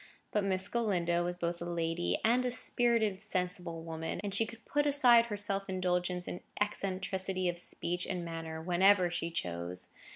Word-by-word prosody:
But 210 - +1
Miss 190 -1 0
Galindo 180 -6 +1
was 175 0 -2
both 170 0 -2
a - - -3
lady 170 0 -1
and 245 +3 +4
a 250 - +1
spirited, 230 -4 +1
sensible 180 -5 -2
woman, 160 0 -4
and 200 -1 -3
she 225 +3 +3
could 230 0 -12
put 290 0 +1
aside 245 -5 +6
her 210 -2 -3
self 200 -1 -1
indulgence 180 -1 0
in 180 - -5 0.2
eccentricity 190 -2 -1
of 175 0 -1
speech 175 0 -2
and 175 -1 -3
manner 165 -1 -5
whenever 180 +1 +4
she 175 -1 -2
chose. 90 - -4
185 Hz, 170 wpm, -32 LUFS, 175-205 Hz, 0.2 s, aside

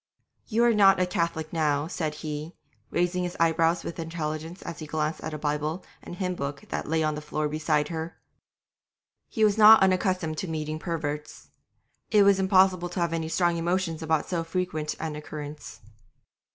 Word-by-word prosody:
'You 230 +1 +2
are 240 -1 +5
not 195 -3 +6
a 185 - +3
Catholic 170 -3 -2
now,' 150 -3 +1
said 155 -2 -3
he, 155 +2 -5 0.3
raising 180 +1 0
his 175 0 -4
eyebrows 165 0 +2
with 170 - -6
intelligence 160 +1 -5
as - - -7
he 155 - -7
glanced 155 0 -2
at 155 0 -5
a - - -4
Bible 150 +3 -2 0.2
and - - -9
hymn 180 0 -2
book 140 -4 -5
that - - -3
lay 160 0 +1
on 155 0 +1
the 150 - -5
floor 150 0 -2
beside 150 0 0
her. 165 0 -5 1.1
He 220 - 0
was 210 +1 +2
not 215 -1 +9
unaccustomed 185 -4 +1
to 190 - -3
meeting 155 -1 -3
perverts; 150 -3 -5 0.6
it 210 -2 +5
was 200 -1 +5
impossible 190 -2 +3
to 175 - -5
have 170 -1 0
any 160 -1 -2
strong 175 0 +1
emotion 170 -1 -1
about 160 -1 0
so 170 -2 -1
frequent 165 -3 -3
an 155 -1 -4
occurrence. 150 -1 -8
165 Hz, 180 wpm, -27 LUFS, 155-180 Hz, 1.1 s, not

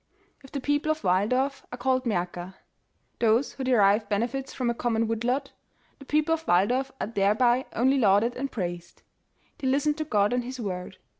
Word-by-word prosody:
If 270 - -14
the 280 - -3
people 290 +3 0
of 310 0 -3
Waldorf 255 +10 +1
f - - -28
are 245 - -6
called 255 0 0
''Maerker", 180 -3 -3 0.6
(Those 230 +3 +2
who 270 - -6
derive 210 -4 +3
benefits 240 +6 -2
from 245 -2 -1
a - - -2
common 230 -1 0
wood 225 0 -2
lot) 265 +3 -1 0.5
The 275 - -12
people 305 +3 +1
of 325 0 -4
Walldorf 245 +9 +2
are - - -1
thereby 230 +5 +2
only 265 +4 +2
lauded 215 +2 +3
and 275 +1 -4
praised. 175 -4 -5 0.6
They 270 - -2
listen 280 +3 +2
to 310 +1 -3
God 210 -6 +1
and 245 0 0
His 255 +1 -7
word. 185 -3 -5
245 Hz, 190 wpm, -26 LUFS, 205-270 Hz, 0.6 s, derive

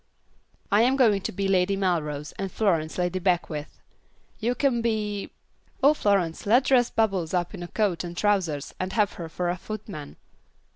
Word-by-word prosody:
"I 205 +2 +5
am 255 +3 +4
going 220 -7 +4
to - - -3
be 195 +1 -2
Lady 195 0 +2
Melrose, 150 -6 -1
and 195 -1 -3
Florence 165 -8 0
Lady 180 +1 0
Beckwith. 175 -5 -1 0.6
You 240 +2 0
can 250 -3 +1
be 210 -3 -1 0.5
Oh, 285 +2 +7
Florence, 195 - 0
let's 245 +5 +4
dress 245 -3 +4
Bubbles 195 -6 0
up 175 -1 -1
in - - -7
a 175 - -5
coat 195 -3 0
and 175 0 -7
trousers, 180 -9 0
and 185 +1 -3
have 210 -3 +2
her 165 - -5
for 175 +1 -1
a 180 - -4
footman." 200 -7 -7
195 Hz, 175 wpm, -26 LUFS, 175-215 Hz, 0.6 s, Oh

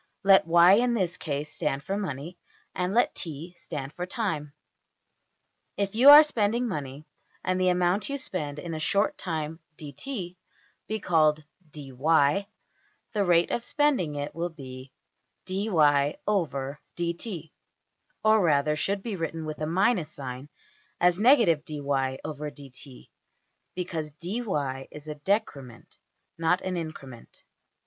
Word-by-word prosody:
Let 195 -3 +6
$y$ 175 +3 +7
in 245 0 +1
this 185 -5 -1
case 150 -1 -4
stand 140 -2 -2
for 195 - -2
money, 170 -3 -5 0.3
and 180 +1 -1
let 240 +4 +2
$t$ 165 +2 -5
stand 145 -4 -7
for 180 0 -5
time. 180 - -3 1.3
If 200 -1 -1
you 250 +6 +7
are 295 +1 +12
spending 235 -3 0
money, 145 - -5 0.4
and 185 0 0
the 185 - +4
amount 180 +4 +1
you 280 - -2
spend 155 - -4
in 165 +2 -6
a 155 - -4
short 200 +6 +2
time~$dt$ 160 - -6 0.5
be 220 0 -2
called~$dy$, 155 -3 -1
the 150 +6 +2 0.7
\emph{rate} 180 -5 +3
of 235 - -1
spending 250 - +1
it 145 0 -4
will 170 +1 -2
be 130 -4 -10 0.5
$\dfrac{dy}{dt}$, 165 - -1 0.7
or 215 -1 +5
rather, 150 -2 +2
should 195 +6 -1
be 220 -4 -3
written 165 -2 -4
with 155 0 -6
a 155 - -1
minus 185 0 +1
sign, 130 0 -7 0.5
as 175 0 +3
$ - - -5
\dfrac{dy}{dt}$, 145 - 0 0.7
because 170 -4 -4
$dy$ 150 - -3
is 150 0 -12
a 150 - -4
\emph{decrement}, 145 - -3 0.4
not 165 +2 +2
an 185 -1 -3
increment. 145 -8 -8
165 Hz, 125 wpm, -27 LUFS, 145-195 Hz, 1.3 s, are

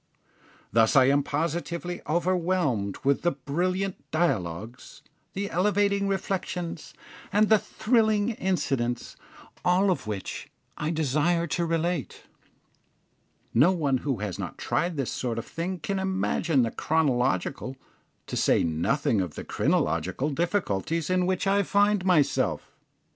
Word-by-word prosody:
Thus 115 +2 +4
I 130 -2 +7
am 140 +1 +4
positively 170 +4 -3
overwhelmed 170 - 0
with 140 0 +2
the 175 - +3
brilliant 180 +8 -2
dialogues, 115 - -2 0.3
the 200 +1 -3
elevating 200 +2 +2
reflections, 180 -4 -3 0.4
and 210 +1 +3
the 220 -1 +6
thrilling 220 -1 +1
incidents, 135 - -1 0.5
all 185 +2 +3
of 170 - -3
which 100 -3 -5 0.3
I 150 - -2
desire 160 +2 +1
to 170 +1 -1
relate. 165 -2 -2 1.3
No 170 +6 +5
one 145 -7 +1
who 135 -3 -2
has 105 -4 -4
not - - -5
tried 170 -2 -1
this 135 -3 -1
sort 120 -3 -3
of 115 - -4
thing 175 +3 -4
can 195 +4 -3
imagine 190 -6 +1
the 115 - -1
chronological, 135 -3 0 0.5
to - - -5
say - - +3
nothing 95 - +1
of 90 -5 -4
the - - -6
crinological, 90 - 0
difficulties 165 - -1
in 180 -1 +2
which 185 0 0
I 200 +1 +3
find 205 0 +2
myself. 175 -6 +1
165 Hz, 125 wpm, -27 LUFS, 135-185 Hz, 1.3 s, I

